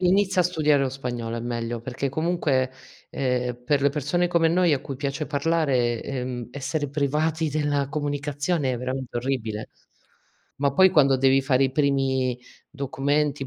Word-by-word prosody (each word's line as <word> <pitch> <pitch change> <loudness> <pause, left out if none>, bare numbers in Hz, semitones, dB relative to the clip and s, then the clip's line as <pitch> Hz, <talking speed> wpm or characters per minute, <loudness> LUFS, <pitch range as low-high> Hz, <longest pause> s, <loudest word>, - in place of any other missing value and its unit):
Inizia 185 +1 +3
a - - +3
studiare 150 -5 +2
lo 135 - +1
spagnolo, 120 -3 -4
è 115 - -3
meglio. 120 -1 -3
Perché 130 +3 -3
comunque, 145 -4 0 0.4
ehm, 125 -2 -2
per 145 0 +1
le 140 - +5
persone 150 +5 0
come 170 -2 +3
noi, 175 0 +3
a 140 - +1
cui 135 -2 -6
piace 140 +3 -3
parlare, 140 -6 +1
ehm, 125 -3 -4
essere 145 +2 -3
privati 155 +3 0
della 145 -2 0
comunicazione 145 0 -1
è 120 - -3
veramente 130 0 -4
orribile. 115 -4 -3 0.9
Ma 140 0 +1
poi 190 +5 +6
quando 140 -6 +4
devi 135 +1 +4
fare 135 -1 +3
i 135 - -1
primi 135 -3 +1 0.3
documenti 140 0 -1
140 Hz, 155 wpm, -25 LUFS, 130-150 Hz, 0.9 s, poi